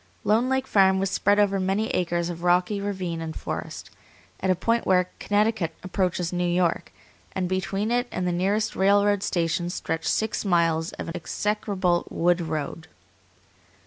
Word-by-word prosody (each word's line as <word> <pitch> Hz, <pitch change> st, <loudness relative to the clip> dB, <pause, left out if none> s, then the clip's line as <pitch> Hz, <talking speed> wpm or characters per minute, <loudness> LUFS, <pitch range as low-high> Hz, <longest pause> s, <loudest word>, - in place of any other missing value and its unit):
Lone 230 Hz, +4 st, +2 dB
Lake 265 Hz, 0 st, +1 dB
Farm 190 Hz, -4 st, +4 dB
was 195 Hz, 0 st, -1 dB
spread 205 Hz, +1 st, +2 dB
over 200 Hz, -1 st, +3 dB
many 195 Hz, +4 st, 0 dB
acres 175 Hz, -1 st, -1 dB
of 170 Hz, -1 st, -8 dB
rocky 180 Hz, +3 st, +2 dB
ravine 185 Hz, -5 st, -3 dB
and 160 Hz, -1 st, -5 dB
forest, -, -, -6 dB, 0.5 s
at 190 Hz, -, -1 dB
a 185 Hz, -, +4 dB
point 230 Hz, +6 st, 0 dB
where 180 Hz, -1 st, +2 dB
Connecticut 205 Hz, -4 st, 0 dB
approaches 180 Hz, -2 st, -1 dB
New 180 Hz, 0 st, 0 dB
York, 175 Hz, -1 st, 0 dB, 0.4 s
and 185 Hz, -1 st, -1 dB
between 195 Hz, +3 st, -1 dB
it 245 Hz, +1 st, +1 dB
and 180 Hz, -, -2 dB
the -, -, +1 dB
nearest 195 Hz, +5 st, 0 dB
railroad 200 Hz, +1 st, +3 dB
station 175 Hz, -1 st, -1 dB
stretched 165 Hz, -2 st, -3 dB
six 220 Hz, 0 st, 0 dB
miles 165 Hz, -4 st, +1 dB
of -, -, -6 dB
an 165 Hz, -, -6 dB
execrable 190 Hz, -1 st, -1 dB
wood 175 Hz, +1 st, +1 dB
road. 160 Hz, 0 st, -4 dB
185 Hz, 160 wpm, -25 LUFS, 175-205 Hz, 0.5 s, Farm